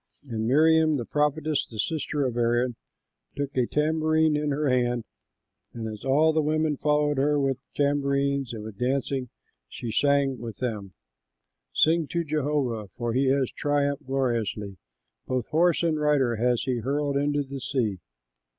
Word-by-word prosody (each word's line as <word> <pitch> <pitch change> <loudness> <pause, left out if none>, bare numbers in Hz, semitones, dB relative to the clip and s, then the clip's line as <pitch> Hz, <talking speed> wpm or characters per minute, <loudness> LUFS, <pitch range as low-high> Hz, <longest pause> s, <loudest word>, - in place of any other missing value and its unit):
And 115 -5 -3
Miriam 155 +3 +4
the 120 - -4
prophetess, 150 +1 0
the 110 - -11
sister 145 +3 -1
of 125 -2 -2
Aaron, 120 +1 +1 0.6
took 140 0 -4
a 125 -2 +2
tambourine 155 0 +2
in 150 0 0
her 145 +1 0
hand; 120 -2 +1 0.7
and 115 -1 -5
as 105 -1 -7
all 150 +4 +3
the 155 - +2
women 155 0 +1
followed 150 0 +1
her 145 +1 +2
with 135 -2 0 0.2
tambourines 140 -2 +1
and 110 -3 -6
with 110 -2 -9
dancing, 130 0 -1 0.4
she 115 - -6
sang 140 +1 +2
with 115 -3 -7
them: 105 -7 -4 0.8
"Sing 160 -1 +3
to 170 +2 -1
Jehovah, 145 -8 -1
for 120 -1 -2
he 130 +2 +2
has 135 -1 +2
triumphed 145 -1 -1
gloriously: 115 -7 -1 0.5
Both 130 -3 -1
horse 170 +2 +3
and 160 -2 +1
rider 140 -6 +2
has 120 +1 +1
he 130 -2 -1
hurled 140 +3 -1
into 145 +1 +1
the 135 0 -7
sea." 115 -8 -1
140 Hz, 155 wpm, -26 LUFS, 120-150 Hz, 0.8 s, Miriam